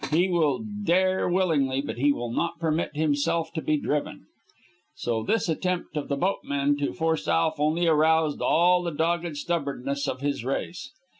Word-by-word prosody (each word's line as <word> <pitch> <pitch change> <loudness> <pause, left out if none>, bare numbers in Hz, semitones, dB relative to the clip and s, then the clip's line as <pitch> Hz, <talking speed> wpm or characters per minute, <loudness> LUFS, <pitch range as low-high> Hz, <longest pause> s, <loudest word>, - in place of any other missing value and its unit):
He 170 +5 +3
will 170 +1 +1 0.2
dare 185 0 +2
willingly, 155 -8 +1
but 140 -4 -4
he 145 +2 +4
will 120 -4 -3
not 170 +6 -1
permit 160 -2 -1
himself 155 +2 0
to 160 - -3
be 155 0 +1
driven. 145 0 -3 0.7
So 115 -2 -2
this 205 - 0
attempt 180 +1 -2
of 150 - -3
the 140 - -1
boatmen 140 -4 0
to 145 - -1
force 160 -1 -1
Alf 160 -2 +1
only 155 +4 +1
aroused 160 -1 +3
all 180 +2 +4
the 175 - -2
dogged 165 0 -1
stubbornness 140 -3 -2
of 130 - -3
his 140 -4 -2
race. 155 - -4
160 Hz, 165 wpm, -26 LUFS, 140-170 Hz, 0.7 s, he